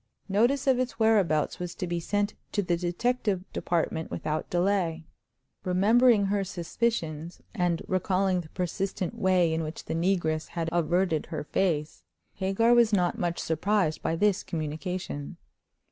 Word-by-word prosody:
Notice 235 +8 +2
of 260 -2 +3
its 255 -2 -2
whereabouts 200 -9 +2
was 180 -1 -5
to - - -3
be 175 -1 -2
sent 205 +4 -1 0.2
to 205 - +1
the 175 -1 +1
Detective 190 +3 -1
Department 160 -1 -1
without 155 0 -3
delay. 175 -3 0 0.6
Remembering 210 +4 +4
her 200 0 0
suspicions, 170 -3 -2
and 175 -5 0
recalling 185 0 +1
the 155 - -13
persistent 185 +2 -3
way 185 -6 +2
in 160 - 0
which 155 0 -6
the - - -3
negress 165 -2 0
had 165 -1 -3
averted 175 -1 +1
her 155 -3 -4
face, 155 -2 -1 0.3
Hagar 200 +5 +2
was 235 -2 +5
not 180 -4 +1
much 175 -1 -1
surprised 165 0 0
by 165 - 0
this 205 +2 +2
communication. 155 -1 -4
180 Hz, 145 wpm, -28 LUFS, 165-205 Hz, 0.6 s, was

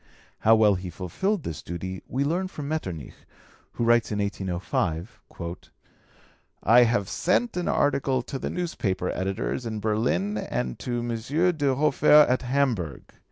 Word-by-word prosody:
How 110 +1 +5
well 110 -2 +5
he 90 -1 -4
fulfilled 150 - -2
this 80 - -5
duty 95 +2 -6
we 135 +3 -1
learn 175 +6 0
from 150 -6 -7
Metternich, 95 - -4 0.6
who - - -2
writes 120 -1 +3
in 105 - -1
1805: 95 -1 -2 1.4
"I 120 +3 +7
have 115 -4 +1
sent 185 - 0
an 180 -1 -2
article 135 -3 +1
to 135 +2 -5
the - - -3
newspaper 110 - -2
editors 95 +6 -2
in 110 -2 -4
Berlin 105 -2 0
and 60 -10 -3
to 120 -1 -2
M. 140 +10 +1
de 140 -3 +1
Hofer 150 +1 +6
at 125 - +1
Hamburg. 125 - -1
115 Hz, 145 wpm, -26 LUFS, 95-140 Hz, 1.4 s, I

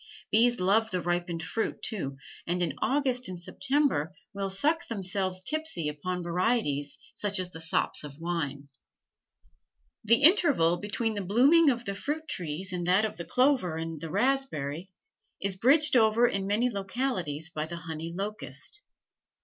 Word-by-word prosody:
Bees 240 +2 +4
love 210 +5 +3
the 185 - -1
ripened 175 -1 -2
fruit, 225 +7 -3
too, 140 -11 -3 0.3
and 175 +1 0
in 160 -5 -1
August 260 -4 0
and 180 -2 -6
September 255 - 0 0.2
will 200 -1 -3
suck 310 - +1
themselves 190 -3 -1
tipsy 310 - -1
upon 180 +5 -4
varieties 170 - 0 0.2
such 205 -1 0
as 185 -1 -1
the 165 - -9
sops 160 -1 0
of 145 -1 -9
wine. 150 -4 -3 1.4
The 230 +5 +5
interval 290 - +5
between 215 +4 -2
the 205 - -3
blooming 270 - +5
of 240 -2 -1
the 200 - -2
fruit 300 +10 -4
trees 180 - -3
and 175 -1 -3
that 190 +4 +4
of 215 - -5
the 170 - -6
clover 250 - +2
and 160 -2 -5
the 165 - -5
raspberry 195 - -1 0.5
is 195 -1 -1
bridged 285 +8 +4
over 225 0 +5
in 195 -3 -2
many 215 +5 +2
localities 190 - -3
by 155 0 -3
the 170 +1 -6
honey 165 0 -6
locust. 210 - -5
195 Hz, 155 wpm, -28 LUFS, 170-245 Hz, 1.4 s, The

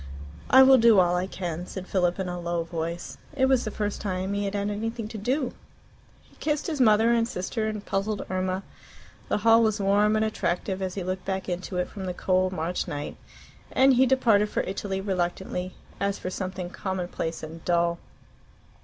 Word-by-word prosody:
"I 265 +1 +9
will 265 0 +7
do 225 -3 +6
all 175 -1 +3
I 180 +1 0
can," 175 -2 -5
said 190 -1 -6
Philip 180 -2 +1
in 190 -1 -2
a 175 0 -4
low 170 -1 -1
voice. 170 +1 -5 0.2
It 265 - +4
was 265 -2 +3
the - - -1
first 210 -1 -3
time 190 -1 -2
he 200 0 -1
had 200 +1 -3
had 205 0 -1
anything 225 +2 -3
to 220 - -6
do. 255 +5 -1 0.7
He - - -25
kissed 300 -1 -1
his 310 -6 -1
mother 220 0 +5
and 230 -1 +2
sister 215 +2 -3
and 215 -1 -4
puzzled 200 +1 -2
Irma. 185 +1 -2 0.7
The - - +2
hall 225 0 +7
was 220 -1 +2
warm 205 +2 +3
and 215 0 +2
attractive 190 -2 -2
as 185 -1 -3
he 195 - -3
looked 185 +1 -4
back 190 -1 -2
into 180 +1 -3
it 180 - 0
from 195 -2 -7
the 180 -1 -3
cold 185 0 +1
March 175 0 -2
night, 145 0 -5 0.6
and 265 +1 +5
he 260 +1 +5
departed 225 -5 +3
for - - 0
Italy 195 0 -3
reluctantly, 180 -1 -2 0.2
as 200 0 0
for 185 - -5
something 185 -1 -4
commonplace 180 -4 -4
and 160 +1 -8
dull. 170 -1 +1
195 Hz, 195 wpm, -26 LUFS, 180-215 Hz, 0.7 s, I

